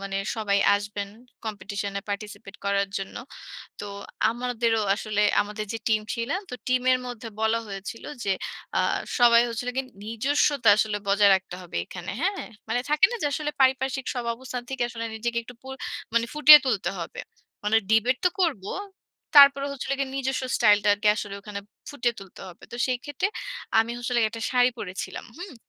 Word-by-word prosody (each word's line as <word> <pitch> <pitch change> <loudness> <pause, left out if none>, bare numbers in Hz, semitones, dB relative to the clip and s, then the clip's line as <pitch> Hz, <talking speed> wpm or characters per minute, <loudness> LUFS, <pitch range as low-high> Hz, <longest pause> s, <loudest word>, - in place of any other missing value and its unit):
মানে 195 0 -4 0.2
সবাই 200 -2 +1 0.2
আসবেন 205 0 -3 0.4
কম্পিটিশনে 200 -1 -4
পার্টিসিপেট 200 -1 -6
করার 200 0 +1
জন্য। 195 - -7 0.6
তো - - -5 0.4
আমাদেরও 235 -1 0
আসলে 215 -1 -1 0.2
আমাদের 210 +1 -5
যে - - -2
টিম 215 -1 +2
ছিল, 235 +2 -3 0.2
তো - - -7
টিমের 255 0 +3
মধ্যে 235 -1 -7
বলা 220 +1 +2
হয়েছিল 200 +3 -7 0.2
যে - - -2 0.5
আ - - +3 0.4
সবাই 235 -1 +7
হচ্ছিল 235 +2 -3
গিয়ে 265 0 -2 0.2
নিজস্বতা 255 +3 +2
আসলে 210 -1 +1
বজায় 200 0 +5
রাখতে 190 -1 -5
হবে 175 - -10
এখানে। 175 - -8
হ্যাঁ? 390 +3 -1 0.2
মানে 235 +2 +1
থাকে 300 +4 +6
না - - -2
যে, - - +3
আসলে 300 0 -2
পারিপার্শ্বিক 265 0 +2
সব 245 - -2
অবস্থান 250 0 -6
থেকে 265 -1 -4
আসলে 230 -1 -5
নিজেকে 235 +1 -2
একটু 245 - -12
পুর 265 0 -7 0.6
ফুটিয়ে 300 0 +10
তুলতে 210 -7 0
হবে। 170 - -6 0.4
মানে 210 +2 +3
ডিবেট 225 +3 +3
তো - - +6
করব। 285 - 0 0.7
তারপরে 280 -1 +8
হচ্ছিল 275 -1 -5
গিয়ে 270 -1 -2
নিজস্ব 265 -1 -1
স্টাইলটাকে 205 -1 +4
আসলে 205 -1 -5
ওখানে 200 0 -6 0.3
ফুটিয়ে 250 -4 -1
তুলতে 195 -2 -13
হবে। 175 - -14
তো - - -6
সেই 255 -1 0
ক্ষেত্রে 290 +6 -1 0.5
আমি 225 +1 +1
আসলে 245 0 0
একটা 230 +1 -8
শাড়ি 250 -1 +4
পরেছিলাম। 185 -1 -6
হুম? 355 -1 -8
230 Hz, 165 wpm, -26 LUFS, 205-260 Hz, 0.7 s, ফুটিয়ে